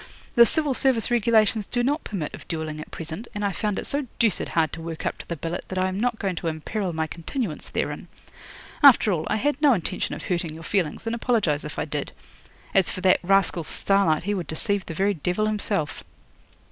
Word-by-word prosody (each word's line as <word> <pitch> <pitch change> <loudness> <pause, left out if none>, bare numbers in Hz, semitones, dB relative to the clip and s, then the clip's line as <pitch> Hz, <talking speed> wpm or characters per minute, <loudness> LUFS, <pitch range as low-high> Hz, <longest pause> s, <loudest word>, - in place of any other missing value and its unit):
The 235 0 +7
Civil 300 0 +2
Service 255 -3 +2
regulations 220 -2 +3
do 245 -1 -1
not 290 +5 0
permit 175 -8 -4
of - - -10
duelling 155 -2 -4
at - - -10
present, 165 +8 -7
and 205 0 -1
I 200 - +1
found 210 +1 -2
it - - -3
so 285 -1 -1
deuced 225 -5 +1
hard 160 -2 +1
to 165 - -6
work 165 -1 -6
up - - -2
to - - -10
the 170 - -3
billet 165 +3 -4
that 185 - -5
I 185 0 +2
am 190 +1 -3
not 240 0 0
going 195 -4 -2
to 170 - -3
imperil 175 +5 -2
my 160 -1 -1
continuance 170 - -4
therein. - - -3 0.7
After 270 -7 +7
all, 160 -4 -1
I - - +2
had 290 +6 0
no 290 -3 +6
intention 185 -2 -2
of - - -9
hurting 170 -3 -2
your 165 - -10
feelings, 180 -2 -1
and 225 - -1
apologise 220 - +1
if 150 - -7
I - - -1
did. 150 -2 -4 0.6
As 190 -2 +3
for 185 - -5
that 185 0 +4
rascal 195 -2 +2
Starlight, 170 -1 +2
he 205 +3 -1
would 180 -4 -3
deceive 195 +4 -1
the 165 - -5
very 200 +3 +2
devil 180 +5 -1
himself." 205 -7 +1
195 Hz, 220 wpm, -25 LUFS, 165-225 Hz, 0.7 s, The